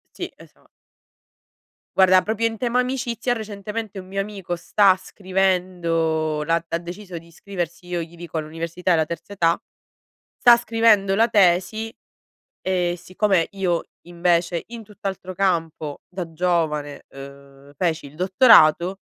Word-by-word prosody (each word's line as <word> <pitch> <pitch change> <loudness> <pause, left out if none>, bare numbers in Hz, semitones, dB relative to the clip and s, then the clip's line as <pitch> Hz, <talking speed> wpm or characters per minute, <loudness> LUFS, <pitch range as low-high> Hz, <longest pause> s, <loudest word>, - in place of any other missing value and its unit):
Sì, - - -5
esa - - -19 1.3
Guarda, 185 -1 +6
proprio 225 +1 0
in 225 -1 -5
tema 245 +1 0
amicizia, 250 -2 -1
recentemente, 210 -1 -6
un 185 - -10
mio 195 +1 -4
amico 195 -4 -4
sta 190 +2 +3
scrivendo 175 -5 0
la 165 +1 0
ha 165 - -1
deciso 175 0 -8
di 165 - -18
iscriversi, 175 0 -6
io 175 -1 -3
gli 165 +1 -9
dico, 170 -1 -5
all'università 165 +3 -4
della 160 -2 +3
terza 170 +5 -7
età. 165 -4 +1 0.8
Sta 240 -1 +7
scrivendo 225 -4 +3
la 225 +1 +5
tesi 210 +2 +2 0.7
e 180 -2 0
siccome 185 -1 +1
io 185 -4 -1 0.2
invece, 175 0 0
in 230 -1 -9
tutt'altro 195 -3 -6
campo 165 -6 -1
da 180 -3 -6
giovane, 155 -4 -1
uhm, 140 +1 -13
feci 165 -1 -1
il 140 +2 -12
dottorato, 185 -2 +5
180 Hz, 130 wpm, -22 LUFS, 165-200 Hz, 1.3 s, Sta